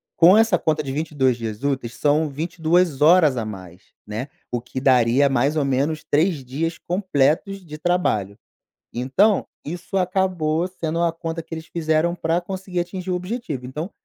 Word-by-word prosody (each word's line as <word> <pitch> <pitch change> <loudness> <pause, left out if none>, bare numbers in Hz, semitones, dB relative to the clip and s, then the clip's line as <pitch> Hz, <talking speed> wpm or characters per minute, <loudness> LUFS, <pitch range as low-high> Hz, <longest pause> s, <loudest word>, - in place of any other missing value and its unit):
Com 180 +5 +7
essa 225 -5 +4
conta 155 -1 0
de 135 - -4
22 140 -4 0
dias 110 0 -6
úteis, 135 -4 -2
são 150 +1 +2
22 165 +1 0
horas 155 -3 +6
a 115 - -2
mais, 95 -3 -9 0.2
né, 110 +5 -5 0.2
o 120 -1 -2
que 125 +1 -6
daria 130 +1 +4
mais 140 +2 +1
ou 150 -3 +1
menos 140 +4 0
3 150 -2 +1
dias 160 +6 -3
completos 180 +1 0
de 150 -1 -9
trabalho, 115 - 0 0.6
então, 135 - +2 0.2
isso 175 +5 -3
acabou 180 -3 0
sendo 170 -2 -3
a 170 -1 +2
conta 165 0 -5
que 165 - -23
eles 160 0 -8
fizeram 160 +1 0
pra 165 0 0
conseguir 185 0 -4
atingir 180 +1 -5
o - - +1
objetivo, 180 - -5
então, 150 +9 -5
155 Hz, 165 wpm, -22 LUFS, 135-175 Hz, 0.6 s, Com